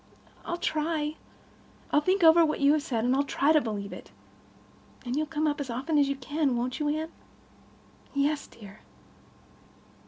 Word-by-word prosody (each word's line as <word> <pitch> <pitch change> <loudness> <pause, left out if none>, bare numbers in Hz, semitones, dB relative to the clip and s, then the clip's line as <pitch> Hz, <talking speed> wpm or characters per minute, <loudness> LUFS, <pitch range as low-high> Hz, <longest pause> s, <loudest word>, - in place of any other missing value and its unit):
"I'll 345 - -3
try. 310 -1 -1 0.7
I'll 295 - +4
think 370 +3 +1
over 330 +1 +7
what 305 -1 0
you 280 +1 +5
have 305 - +1
said, 240 -7 -2
and 270 +3 +1
try 285 +3 +2
to 310 -1 +5
believe 205 -4 -4
it. - - -11 1.0
And 245 +1 -2
you'll 310 +1 0
come 310 0 -1
up 295 -1 0
as 270 - -5
often 275 +6 0
as 280 -1 +3
you 275 - -1
can, 275 -1 -1
won't 250 +2 -2
you, 300 -1 0
Anne?" 315 +2 -2 1.0
"Yes, 285 +1 0
dear." 205 -2 -14
295 Hz, 165 wpm, -28 LUFS, 260-310 Hz, 1.0 s, over